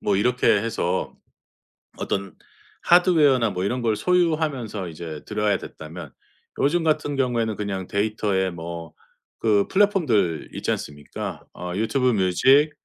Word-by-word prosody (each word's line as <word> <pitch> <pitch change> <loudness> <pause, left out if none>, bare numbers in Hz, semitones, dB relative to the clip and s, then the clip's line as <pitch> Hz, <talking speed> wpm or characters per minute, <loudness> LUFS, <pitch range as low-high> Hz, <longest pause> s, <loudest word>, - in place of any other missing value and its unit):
뭐 100 -2 +1
이렇게 125 +5 +1
해서 100 -4 +1 0.8
어떤 100 -3 -3 0.5
하드웨어나 150 - +5
뭐 90 -1 -3
이런 125 +6 -1
걸 115 -2 +1
소유하면서 150 - 0
이제 80 -2 -7
들어야 105 -1 0
됐다면 80 -2 -9 0.5
요즘 165 +5 +2
같은 150 -2 0
경우에는 120 -5 0
그냥 95 -3 -4
데이터에 100 -2 0
뭐 85 -1 -7 0.5
그 105 -3 +3
플랫폼들 140 - +2
있지 - - -4
않습니까? 75 0 -5
어 - - -8
YouTube 115 +7 +1
music, 125 - +4
105 Hz, 320 characters per minute, -23 LUFS, 95-135 Hz, 0.8 s, 하드웨어나